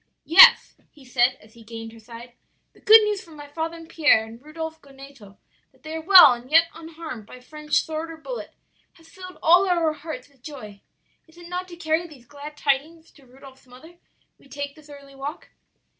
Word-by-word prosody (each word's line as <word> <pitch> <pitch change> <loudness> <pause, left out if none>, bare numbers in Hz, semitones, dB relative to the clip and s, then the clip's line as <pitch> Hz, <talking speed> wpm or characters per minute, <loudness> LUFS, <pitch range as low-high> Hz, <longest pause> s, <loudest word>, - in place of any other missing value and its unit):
"'Yes,' 475 +10 +6
he 285 -3 -20
said, 250 0 +1
as 215 +1 -21
he 235 - -17
gained 225 0 -10
her 230 - -15
side, 235 +2 -13 0.4
'the - - -23
good 440 0 +7
news 420 -2 -3
from 325 -3 -16
my 290 -1 -11
father 325 +3 -6
and 330 -1 -13
Pierre, 295 -9 +2
and 225 +2 -14
Rudolph 320 +1 -8
Goneto 270 -7 -16 0.3
that - - -31
they 310 +1 -8
are 320 - -5
well 350 -6 +8
and 240 +1 -11
yet 330 +2 +4
unharmed 320 -8 -10
by 250 - -13
French 300 +4 -2
sword 320 +1 -6
or 325 - -10
bullet - - -9 0.4
has 330 -1 -22
filled 365 -1 -12
all 360 +4 +4
our 335 -3 0
hearts 300 -4 -9
with 280 -3 -31
joy. 215 -9 -11 0.5
Is 320 +1 -23
it 345 0 -13
not 360 +1 -5
to 350 - -12
carry 325 0 -2
these 275 -7 -17
glad 290 +3 -12
tidings 305 +4 -3
to 275 -3 -23
Rudolph's 265 +1 -18
mother 315 +8 -17 0.4
we 275 - -23
take 285 +1 -7
this 305 0 -20
early 280 -1 -14
walk?' 275 +4 -8
300 Hz, 205 wpm, -23 LUFS, 260-330 Hz, 0.5 s, well